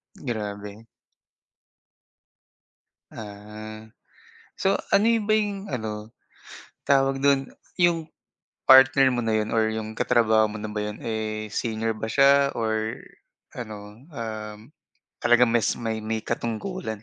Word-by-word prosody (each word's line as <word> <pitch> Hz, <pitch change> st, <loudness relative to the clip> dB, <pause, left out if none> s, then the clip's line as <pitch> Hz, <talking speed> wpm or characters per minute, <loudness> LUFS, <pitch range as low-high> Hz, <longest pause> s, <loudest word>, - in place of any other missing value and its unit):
Grabe. 105 Hz, -3 st, -6 dB, 2.3 s
Ah. 110 Hz, +1 st, -9 dB, 0.8 s
So 195 Hz, +1 st, +3 dB, 0.2 s
ano 200 Hz, +2 st, +5 dB
yun 225 Hz, -2 st, +2 dB
ba 215 Hz, -, +1 dB
yung 205 Hz, -2 st, -1 dB
ano, 110 Hz, -2 st, -5 dB, 0.8 s
tawag 135 Hz, -1 st, +3 dB
dun? 135 Hz, -1 st, +2 dB, 0.2 s
Yung 170 Hz, -3 st, +2 dB, 0.6 s
partner 135 Hz, 0 st, +7 dB
mo 120 Hz, -1 st, -1 dB
na 110 Hz, -, +1 dB
yun 110 Hz, 0 st, 0 dB
or 110 Hz, -1 st, +2 dB
yung 110 Hz, 0 st, -4 dB
ka-trabaho 110 Hz, -3 st, +3 dB
mo 105 Hz, 0 st, -6 dB
na 105 Hz, 0 st, -5 dB
ba 105 Hz, 0 st, -3 dB
yun 105 Hz, -, -7 dB
eh, 110 Hz, -1 st, -3 dB
senior 115 Hz, 0 st, -2 dB
ba 110 Hz, +1 st, -5 dB
siya 140 Hz, +3 st, +4 dB
or 110 Hz, -1 st, -2 dB, 0.5 s
ano, 105 Hz, -3 st, -9 dB
um, 110 Hz, -6 st, -6 dB, 0.6 s
talagang 120 Hz, 0 st, +4 dB
mas 115 Hz, -2 st, +2 dB
may 110 Hz, -2 st, -3 dB
may 110 Hz, 0 st, -3 dB
katungkulan 115 Hz, -, -4 dB
110 Hz, 120 wpm, -25 LUFS, 110-135 Hz, 2.3 s, partner